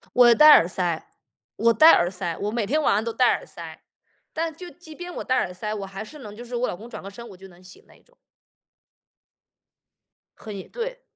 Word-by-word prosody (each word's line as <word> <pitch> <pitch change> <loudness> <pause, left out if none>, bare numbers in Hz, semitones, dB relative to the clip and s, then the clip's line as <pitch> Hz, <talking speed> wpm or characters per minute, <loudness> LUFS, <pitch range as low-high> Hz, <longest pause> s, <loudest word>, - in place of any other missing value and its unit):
我 240 -1 +7
戴 305 +3 +8
耳 170 - +7
塞， 175 -3 -2 0.5
我 230 +2 +3
戴 315 +9 +7
耳 175 +1 +3
塞， 175 -4 -4
我 205 +1 -3
每 225 -2 -2
天 305 +7 0
晚 - - +2
上 210 +2 +1
都 230 - -3
戴 250 0 +4
耳 - - -4
塞， - - -10 0.5
但 320 -1 -3
就 355 +2 -10
即 335 -3 -14
便 355 +1 -8
我 - - -6
戴 255 - 0
耳 180 -7 -1
塞， 210 +3 -5
我 200 -2 -5
还 195 +2 -8
是 300 +7 -12
能 210 -5 -11
就 240 - -9
是 245 +1 -9
我 240 +1 -1
老 - - -4
公 225 +5 -12
转 215 - -8
个 195 - -8
身 235 +4 -11
我 - - -12
就 190 +1 -14
能 180 0 -19
醒 185 - -10
那 - - -20
一 - - -24
种。 - - -28 2.2
很 210 -2 -9
也 190 - -9
对。 - - -6
230 Hz, 255 characters per minute, -24 LUFS, 195-300 Hz, 2.2 s, 戴